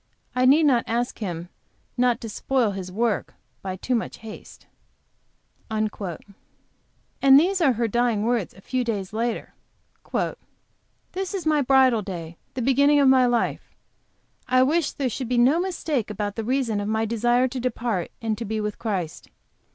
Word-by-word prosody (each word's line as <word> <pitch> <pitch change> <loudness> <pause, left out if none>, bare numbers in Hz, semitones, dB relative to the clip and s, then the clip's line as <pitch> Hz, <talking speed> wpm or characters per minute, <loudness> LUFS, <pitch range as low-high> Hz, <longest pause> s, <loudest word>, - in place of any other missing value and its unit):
I 255 0 +3
need 300 +4 +6
not 250 -5 +4
ask 240 +2 -1
Him 175 -4 -5 0.5
not 245 -2 +2
to 230 - -5
spoil 245 0 0
His 190 -2 -6
work 225 +2 -1 0.3
by 190 -1 -4
too 250 +7 -3
much 230 - -2
haste." 215 - -11 1.0
"And 215 -1 -2 1.2
these 300 +9 +6
were 275 -6 +4
her 230 0 0
dying 235 -1 +1
words, 230 -4 -1
a 190 - -15
few 255 +4 -1
days 210 -5 -3
later: 230 +1 -2 1.6
"This 385 +1 -3
is 365 -4 -4
my 305 -2 +3
bridal 260 -4 +4
day, 170 -4 -7 0.2
the 255 - -2
beginning 280 +3 +4
of 275 -2 +5
my 260 -1 +5
life. 240 -1 -1 0.7
I 255 0 +4
wish 305 +3 +1
there 275 - -2
should 250 0 -4
be 250 - +1
no 260 +7 +4
mistake 320 - -2
about 205 -1 -3
the 225 - -3
reason 240 -3 0
of 205 - -3
my 220 +1 0
desire 240 +3 +2
to 255 +1 -4
depart 235 -6 -2
and 220 -1 0
to - - -3
be 220 0 -3
with 210 -1 -3
Christ. 185 -8 -4
240 Hz, 165 wpm, -24 LUFS, 215-265 Hz, 1.6 s, need